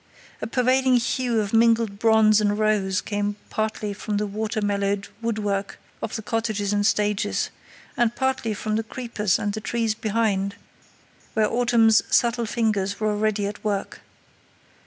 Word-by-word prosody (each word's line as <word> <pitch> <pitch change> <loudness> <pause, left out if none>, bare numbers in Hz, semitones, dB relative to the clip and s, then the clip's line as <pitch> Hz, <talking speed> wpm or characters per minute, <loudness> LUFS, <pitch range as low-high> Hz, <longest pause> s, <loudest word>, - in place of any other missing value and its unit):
A - - -3
pervading 255 +2 +2
hue 240 -1 +1
of 205 0 -4
mingled 225 -2 +3
bronze 220 -1 +5
and 205 0 +1
rose 205 -3 +1
came 205 0 -2 0.2
partly 215 -1 -2
from 205 +1 -3
the 210 - 0
weather 215 +2 -3
mellowed 200 -1 -1
woodwork 205 -3 -2 0.2
of - - -4
the 220 - -5
cottages 215 -2 -1
and 205 0 +1
stages, 210 -1 0 0.4
and 240 -1 +1
partly 260 -5 -1
from 215 +1 -2
the 225 - -1
creepers 220 -4 -1
and 205 0 -2
the 215 - -4
trees 225 0 0
behind, 210 -3 -1 0.8
where 215 -1 +3
autumn's 230 -2 +4
subtle 235 -1 +2
fingers 205 -4 0
were 215 -1 +1
already 210 -1 0
at 205 +1 -6
work. 205 -2 -3
215 Hz, 150 wpm, -24 LUFS, 205-230 Hz, 0.8 s, bronze